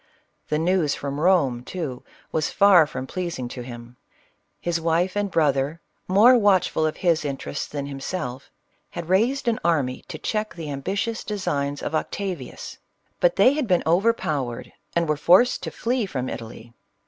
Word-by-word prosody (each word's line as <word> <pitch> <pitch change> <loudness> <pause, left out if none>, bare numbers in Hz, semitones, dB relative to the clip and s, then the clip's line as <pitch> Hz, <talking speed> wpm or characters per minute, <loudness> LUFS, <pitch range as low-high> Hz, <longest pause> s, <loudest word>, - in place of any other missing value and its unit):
The 150 - +1
news 165 -2 +1
from 140 0 -4
Eome, 150 -8 +2
too, 145 -6 -5 0.3
was 155 -1 0
far 190 -6 +6
from 130 -3 -5
pleas 175 +4 -4
ing 125 -1 -4
to 125 - -7
him; 120 0 -10 0.6
his 170 -1 -1
wife 170 +3 +1
and 205 -1 0
brother, 145 -2 +1 0.3
more 215 +7 +6
watchful 185 -6 +3
of 155 - -4
his 170 -4 +2
interests 140 0 -4
than 145 -1 -5
himself, 135 -1 -5 0.4
had 170 -1 -7
raised 240 +8 +2
an 230 -2 +1
army 145 -7 0
to - - -6
check 215 +5 -3
the 160 -4 -6
ambitious 200 +11 -2
designs 145 -9 -2
of - - -3
Octavius; 175 -2 -4 0.4
but - - +3
they 260 - +5
had 290 -4 -1
been 180 -3 +2
overpowered, 160 - 0 0.2
and 170 -1 +2
were 150 -1 +1
forced 180 +11 +4
to - - -4
flee 240 -2 -1
from 130 -7 -3
Italy. 115 0 -8
165 Hz, 160 wpm, -24 LUFS, 140-190 Hz, 0.6 s, far